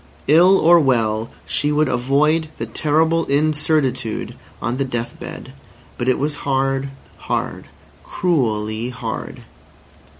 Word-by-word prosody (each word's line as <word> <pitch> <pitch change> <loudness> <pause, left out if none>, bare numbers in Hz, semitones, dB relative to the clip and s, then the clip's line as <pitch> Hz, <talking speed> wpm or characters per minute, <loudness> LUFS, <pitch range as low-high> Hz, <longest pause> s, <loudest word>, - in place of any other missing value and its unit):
Ill 175 +6 +6
or 170 0 +6
well 115 -6 +1 0.2
she 145 +1 0
would 150 0 +2
avoid 145 +6 +1
the - - -4
horrible 160 +2 +2
incertitude 145 -5 0 0.3
on 120 +3 -2
the 135 - 0
death 120 -3 -4
bed. - - -9 0.5
But 120 - 0
it 130 - +2
was 150 +1 -2
hard, 135 0 -1 0.3
hard, - - -3 0.4
cruelly 115 -9 -1
hard. 120 -3 -6
135 Hz, 120 wpm, -20 LUFS, 120-155 Hz, 0.5 s, Ill